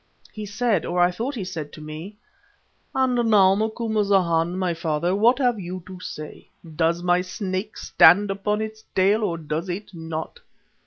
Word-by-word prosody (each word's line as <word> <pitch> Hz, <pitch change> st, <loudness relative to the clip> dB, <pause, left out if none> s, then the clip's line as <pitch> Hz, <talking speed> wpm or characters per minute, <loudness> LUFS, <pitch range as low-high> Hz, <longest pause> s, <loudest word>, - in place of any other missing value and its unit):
He 215 Hz, -1 st, -6 dB
said, 205 Hz, -2 st, 0 dB
or 175 Hz, +1 st, -2 dB
I 175 Hz, 0 st, +4 dB
thought 235 Hz, +10 st, -4 dB
he 215 Hz, -, -4 dB
said, 165 Hz, -5 st, -6 dB
to -, -, -10 dB
me: 155 Hz, +7 st, -8 dB, 0.8 s
"And 250 Hz, -3 st, +2 dB
now, 195 Hz, -3 st, +6 dB
Macumazana, 200 Hz, -6 st, +1 dB
my 185 Hz, -2 st, 0 dB
father, 165 Hz, +2 st, -1 dB
what 235 Hz, +5 st, +4 dB
have 245 Hz, -5 st, +1 dB
you 180 Hz, -1 st, -6 dB
to 185 Hz, -1 st, -10 dB
say? 155 Hz, -4 st, -8 dB, 0.3 s
Does 170 Hz, +2 st, +1 dB
my 180 Hz, 0 st, +3 dB
Snake 190 Hz, +2 st, -4 dB
stand 195 Hz, +5 st, +5 dB
upon 210 Hz, +2 st, -1 dB
its 220 Hz, 0 st, -8 dB
tail 200 Hz, +4 st, +3 dB
or 170 Hz, -5 st, -1 dB
does 160 Hz, +3 st, -4 dB
it 190 Hz, +4 st, -5 dB
not? 160 Hz, -1 st, -6 dB
185 Hz, 165 wpm, -23 LUFS, 170-215 Hz, 0.8 s, now